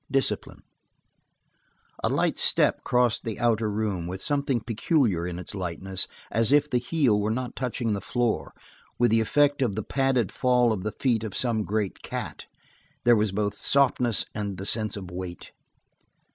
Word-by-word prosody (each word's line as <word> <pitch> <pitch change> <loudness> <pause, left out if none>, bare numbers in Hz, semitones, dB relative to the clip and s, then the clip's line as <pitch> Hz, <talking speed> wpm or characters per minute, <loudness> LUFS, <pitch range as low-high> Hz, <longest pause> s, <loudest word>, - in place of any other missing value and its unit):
Discipline 135 -1 -1 1.4
A - - +2
light - - +1
step - - +4
crossed 125 -2 +1
the 110 -2 -4
outer 115 -2 +2
room, 100 -5 -2
with 95 +2 -5
something 140 0 0
peculiar 110 - 0
in 90 -1 -5
its 90 - -5
lightness, 95 0 -2 0.2
as 115 +1 +3
if 145 0 +4
the 125 -4 +1
heel 125 -5 +1
were 105 +1 0
not 125 +2 -3
touching 120 -3 -2
the 100 - -3
floor, 120 +2 -1 0.5
with 120 -2 +3
the 115 0 +4
effect 145 +5 +2
of 115 -7 +1
the 110 - -3
padded 135 -6 +1
fall 125 -2 +2
of 100 - -4
the 110 +3 -3
feet 115 -3 0
of 110 -3 -5
some 115 -3 +1
great 105 -1 -2
cat; - - -6 0.6
there 120 0 +6
was 105 -2 +1
both 105 +1 -2
softness 125 -5 +2
and 100 -3 -4
the 95 - -6
sense 110 0 0
of 95 -3 -8
weight. 90 -1 -7
110 Hz, 170 wpm, -26 LUFS, 100-125 Hz, 1.4 s, there